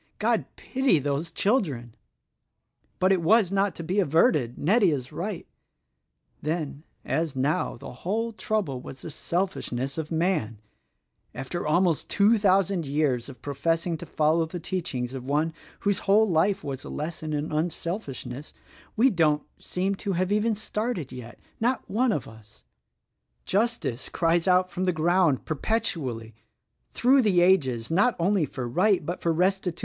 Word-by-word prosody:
God - - +1
pity 265 -9 +1
those 145 +3 -1
children! 160 - 0 1.0
"But 185 +1 +3
it 190 -3 +3
was 200 +2 +4
not 195 -2 +1
to 170 - -6
be 185 +5 0
averted. 150 -7 +2
Nettie 195 +5 +3
is 135 -4 -3
right. 185 0 -4 1.0
Then 155 -2 -3 0.2
as 160 -3 -1
now 135 +1 0
the - - -9
whole 225 +5 -1
trouble 210 - -2
was 130 - -10
the 160 - -6
selfishness 155 -6 -2
of 160 0 -5
man' 160 - 0 0.8
After 135 +7 -4
almost 170 0 +2
two 210 +2 +4
thousand 195 -2 +2
years 140 -4 0
of 130 - -13
professing 165 +4 -1
to - - -9
follow 160 +2 +2
the 175 +2 -6
teachings 140 -9 -3
of 130 -2 -6
one 150 +4 0 0.3
whose 200 -2 +1
whole 210 +3 +4
life 185 +2 +2
was 140 -2 -5
a - - -8
lesson 155 0 -4
in 150 +1 -2
unselfishness, 155 - -4 0.4
we 250 +4 +4
don't 155 -5 +2 0.2
seem 190 +2 -1
to 195 0 -3
have 185 +2 0
even 210 +2 +2
started 210 - -3
yet 120 -2 -9 0.2
Not 245 +2 0
one 240 +4 +1
of 150 - -2
us 105 - -16 0.8
Justice 205 - 0
cries 165 +1 +1
out 185 0 +3
from 185 +2 -2
the 180 - +2
ground 165 -2 +2
per - - -1
petually, 140 - -2 0.6
through 260 +3 +4
the 195 -6 +3
ages, 140 -10 +2
not 210 +8 +3
only 185 -1 +2
for 125 -1 -5
right 185 - +2
but 175 +3 -4
for 170 - +1
resti! 180 +1 +1
170 Hz, 155 wpm, -26 LUFS, 145-195 Hz, 1.0 s, was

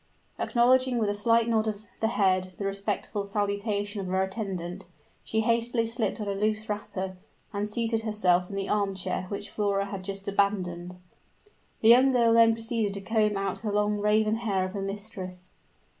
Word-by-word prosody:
Acknowledging 255 +1 +3
with 215 -3 +1
a - - -1
slight 230 +2 +3
nod 225 -1 +2
of 215 0 -4
the 220 - +2
head 185 -4 +1
the 200 - -4
respectful 200 +1 -2
salutation 205 0 -2
of 190 - -5
her 190 +1 +1
attendant, 190 -2 -4 0.4
she 220 - 0
hastily 230 +1 +1
slipped 230 0 -2
on 210 - -4
a 200 - 0
loose 215 +2 -1
wrapper, 190 -2 -4 0.4
and 205 +1 -1
seated 225 +1 0
herself 185 -5 +1
in 200 - -6
the 195 0 -2
arm 200 -2 0
chair 185 0 -3
which 200 0 -5
Flora 200 -1 0
had 195 -1 -6
just 195 +1 -6
abandoned. 185 -3 0 0.9
The 225 - +5
young 255 +3 +7
girl 235 -2 +4
then 230 0 +6
proceeded 225 -3 -1
to 200 - -5
comb 215 -1 +1
out 195 0 -2
the 215 -2 -2
long 210 0 +1
raven 215 +1 +2
hair 200 -5 0
of 185 - -5
her 200 0 -4
mistress. 190 -2 -6
205 Hz, 180 wpm, -28 LUFS, 195-225 Hz, 0.9 s, young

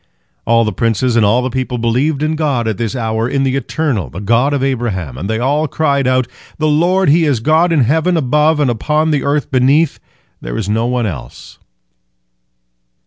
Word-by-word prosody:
All 115 0 +3
the 110 - -2
princes 115 +1 0
and 115 - +3
all 115 +5 +2
the 130 - -2
people 130 0 -3
believed 130 +6 0
in 155 +1 0
God 140 -7 -1
at 110 -3 -3
this 115 +2 -2
hour, 115 -1 -2
in 135 0 0
the 135 -1 0
Eternal, 135 - -2
the 85 - -8
God 115 +7 +1
of 140 -2 -1
Abraham, 110 - -2
and 90 +10 -5
they 110 - 0
all 145 +6 0
cried 140 -3 0
out, 130 -1 +2 0.3
"The 155 - 0
Lord 175 +5 +2
He 165 +3 +4
is 140 -6 +1
God 160 +8 +2
in 160 -4 +3
heaven 160 +8 +1
above 150 +2 +2
and 140 -4 +2
upon 150 +7 0
the 145 -2 0
earth 145 0 -1
beneath; 140 +4 +2 0.4
there - - -5
is 105 - -3
none 115 +3 0
else." 70 - -8
130 Hz, 195 wpm, -15 LUFS, 115-150 Hz, 0.4 s, He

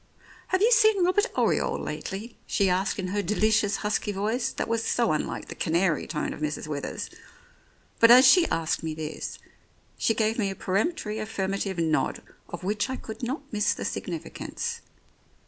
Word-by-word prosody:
"Have 375 +2 +1
you 465 - +5
seen 435 -5 +5
Robert 410 +5 +3
Oriole - - +2
lately? 215 +5 -6
" - - -36
she 195 -3 +2
asked 185 +3 0
in 185 -2 -3
her 205 +2 0
delicious 210 +1 +2
husky 210 0 0
voice, 220 +5 -1
that - - -3
was 230 0 0
so 235 -6 +1
unlike 155 - -2
the - - -6
canary 165 0 0
tone 150 - -2
of - - -10
Mrs. 150 -1 -2
Withers. 150 -2 -4 0.9
But 230 - +7
as 250 +3 +9
she 345 +6 +7
asked 160 -1 -1
me 160 -1 -4
this, 155 -1 -5 0.6
she 225 - +2
gave 220 +1 +1
me 200 -3 +1
a 195 - -5
peremptory 215 - -1
affirmative 195 -2 -2
nod 160 -2 0 0.3
of 175 - -7
which 205 +6 -1
I 260 - -2
could 220 -3 -8
not 260 +5 -3
miss 210 +1 +2
the - - -5
significance. 470 0 -4
210 Hz, 175 wpm, -27 LUFS, 185-240 Hz, 0.9 s, as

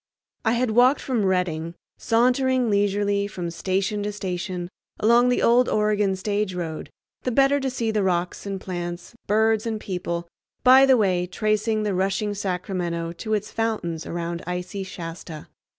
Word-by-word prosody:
I 225 - +2
had 240 -1 +1
walked 250 +5 +5
from 240 -6 -1
Redding, 170 -3 -1 0.2
sauntering 250 +1 +2
leisurely 200 0 +1
from 175 -4 -5
station 190 +4 -1
to 205 +1 -2
station 185 -2 -4 0.3
along 235 +3 +5
the 245 - +1
old 240 +2 +4
Oregon 210 -2 +1
stage 200 0 -2
road, 165 -3 -5 0.3
the - - -1
better 275 +3 +3
to 270 -1 -1
see 235 -3 -1
the 215 -1 +1
rocks 180 0 -1
and 195 -1 -3
plants, 175 +1 -6
birds 220 +1 +2
and 220 -1 -2
people, 175 -3 -4 0.4
by 260 +1 +8
the 260 -1 +6
way, 185 -4 +1
tracing 215 +3 0
the 205 -2 0
rushing 195 +3 0
Sacramento 180 -3 -3
to 215 +6 -2
its 210 0 -4
fountains 210 -8 -2
around 170 0 -4
icy 180 +2 -4
Shasta. 165 -4 -8
200 Hz, 155 wpm, -24 LUFS, 180-225 Hz, 0.4 s, by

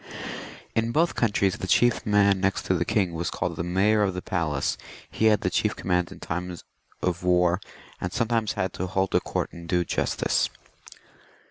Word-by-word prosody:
In 115 +1 +1
both 165 +6 +2
countries 100 -3 +1
the 95 - -4
chief 120 +6 +3
man 100 -2 +4
next 95 0 +1
to - - +2
the 85 -1 0
king 100 -5 +1
was 85 +1 -2
called 90 -1 -2
the 85 - -3
Mayor 100 +5 +2
of 95 -3 +1
the 90 - -3
Palace; 75 -7 -1 0.4
he 110 - 0
had 110 -1 +5
the - - 0
chief - - +1
command 90 -2 0
in - - -10
time 90 +1 -4 0.5
of 90 -2 0
war, 90 0 +3 0.4
and 90 - -2
sometimes 115 0 0
had 95 0 -2
to 95 - -3
hold 95 +1 0
a - - +5
court - - -3
and 85 0 -10
do 90 -1 +2
justice. - - 0
95 Hz, 190 wpm, -26 LUFS, 90-105 Hz, 0.5 s, had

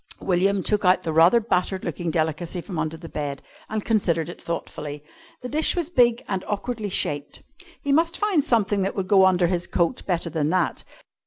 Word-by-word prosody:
William 190 +1 +1
took 210 -1 +1
out 185 0 +4
the 160 - -2
rather 165 +9 +6
battered 190 -3 -1
looking 175 -2 -3
delicacy 160 +2 -1
from 175 -1 -5
under 160 +1 -2
the 165 0 -10
bed 145 -3 -5 0.3
and 215 -1 -3
considered 170 -7 +1
it 175 - -9
thoughtfully. 150 -3 -5 0.4
The 250 - -5
dish 310 +3 +1
was 345 -2 -2
big 240 -6 +3
and 190 -2 -2
awkwardly 215 +1 -3
shaped. 145 -5 -2 0.4
He 280 - 0
must 330 +4 +2
find 405 -8 +2
something 205 -5 +1
that 195 +1 -1
would 190 -2 -2
go 190 -1 +6
under 180 -1 +3
his 175 0 0
coat 170 -2 0
better 170 -2 -1
than 150 -1 0
that. 180 0 0
185 Hz, 190 wpm, -24 LUFS, 165-215 Hz, 0.4 s, rather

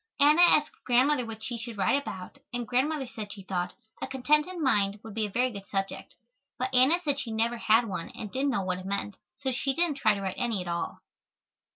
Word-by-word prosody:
Anna 300 +4 +6
asked 310 -3 +4
Grandmother 255 +1 +3
what 220 -1 -8
she 235 +1 -4
should 225 -1 -7
write 275 +8 +2
about, 190 +1 -8
and 240 -2 -3
Grandmother 270 +5 +1
said 215 -4 -7
she 195 - -9
thought 180 -2 -2 0.3
"A - - -2
Contented 300 +7 +1
Mind" 210 -9 +1
would 225 - -9
be 215 0 -1
a - - -9
very 250 +5 +1
good 200 -2 -9
subject, 195 0 -4 0.4
but 255 +1 -2
Anna 260 +7 +5
said 285 -3 0
she 245 - -4
never 230 +2 0
had 225 +1 +4
one 180 -4 -4
and 210 -3 -6
didn't 275 +2 0
know 240 -7 0
what 185 -1 -2
it 185 - -9
meant, 200 0 -3 0.2
so 270 -2 -2
she 270 +2 -1
didn't 335 -3 +1
try 215 -6 +3
to 200 - -5
write 190 -1 -3
any 230 -4 0
at 180 - -5
all. 170 0 -3
240 Hz, 225 wpm, -28 LUFS, 200-275 Hz, 0.4 s, Anna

